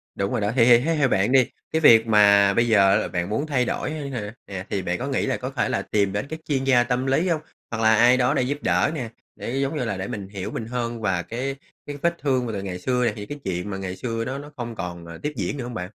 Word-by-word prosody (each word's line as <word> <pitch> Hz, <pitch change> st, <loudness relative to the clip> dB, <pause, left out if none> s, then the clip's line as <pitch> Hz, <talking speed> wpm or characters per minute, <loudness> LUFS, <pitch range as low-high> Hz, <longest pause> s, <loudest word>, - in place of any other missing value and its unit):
đúng 100 Hz, 0 st, -2 dB
rồi -, -, -1 dB
đó. 105 Hz, +1 st, 0 dB
Thì 115 Hz, -3 st, +5 dB
thì 120 Hz, -1 st, +7 dB
thế 165 Hz, +5 st, 0 dB
theo 140 Hz, -3 st, +3 dB
bạn 100 Hz, +5 st, +2 dB
đi, 130 Hz, -3 st, +4 dB, 0.2 s
cái 160 Hz, -, +1 dB
việc 115 Hz, -5 st, +7 dB
mà 100 Hz, -2 st, +5 dB
bây 120 Hz, +3 st, +2 dB
giờ 100 Hz, -2 st, +4 dB
bạn 90 Hz, +2 st, -1 dB
muốn 140 Hz, +9 st, -1 dB
thay 125 Hz, -5 st, +1 dB
đổi 140 Hz, -, -2 dB
hơn 145 Hz, -3 st, -5 dB
hả, 105 Hz, -5 st, -5 dB
yeah, 95 Hz, 0 st, -7 dB
thì 100 Hz, -, -1 dB
bạn 90 Hz, 0 st, -2 dB
có 130 Hz, -, -3 dB
nghĩ 135 Hz, -, 0 dB
là 135 Hz, -, -1 dB
có 130 Hz, -, -5 dB
thể 130 Hz, -3 st, -1 dB
là 100 Hz, -, 0 dB
tìm 100 Hz, -1 st, 0 dB
đến 100 Hz, +7 st, -2 dB
các 160 Hz, -, -5 dB
chuyên 135 Hz, -3 st, 0 dB
gia 125 Hz, -3 st, +4 dB
tâm 125 Hz, +1 st, -1 dB
lý 145 Hz, +7 st, +1 dB
hông? 155 Hz, -2 st, 0 dB, 0.3 s
Hoặc 115 Hz, -1 st, -3 dB
là 110 Hz, 0 st, +5 dB
ai 120 Hz, +3 st, +5 dB
đó 125 Hz, -1 st, +2 dB
để -, -, +1 dB
giúp 140 Hz, +3 st, -1 dB
đỡ -, -, +2 dB
nè, 120 Hz, -6 st, -4 dB, 0.3 s
để, -, -, -6 dB
giống 140 Hz, +3 st, -1 dB
như 125 Hz, -, -1 dB
là, 100 Hz, -4 st, -2 dB
để 95 Hz, +1 st, -4 dB
mình 100 Hz, -2 st, -5 dB
hiểu 100 Hz, +2 st, -5 dB
mình 110 Hz, -, -4 dB
hơn 120 Hz, -1 st, -4 dB
và 95 Hz, -4 st, 0 dB
cái 130 Hz, +7 st, -4 dB, 0.3 s
cái 145 Hz, -1 st, -6 dB
vết 170 Hz, 0 st, +1 dB
thương 130 Hz, -3 st, 0 dB
mà 115 Hz, -, -3 dB
từ 100 Hz, -, -3 dB
ngày 90 Hz, -2 st, -5 dB
xưa 125 Hz, +4 st, 0 dB
nè, 110 Hz, -, +1 dB
thì 105 Hz, -, -7 dB
cái 145 Hz, +6 st, -7 dB
chuyện 95 Hz, +2 st, -3 dB
mà 95 Hz, -, -4 dB
ngày 95 Hz, -1 st, -5 dB
xưa 115 Hz, 0 st, -3 dB
đó 135 Hz, +3 st, -3 dB
nó 145 Hz, +1 st, -9 dB
không 120 Hz, -1 st, -5 dB
còn, 85 Hz, -4 st, -6 dB
ờ, 85 Hz, 0 st, -9 dB
tiếp 150 Hz, -, -2 dB
diễn 145 Hz, -, -3 dB
nữa 125 Hz, -, -4 dB
hông 120 Hz, 0 st, -6 dB
bạn? 100 Hz, -, -4 dB
115 Hz, 300 wpm, -24 LUFS, 100-135 Hz, 0.3 s, thì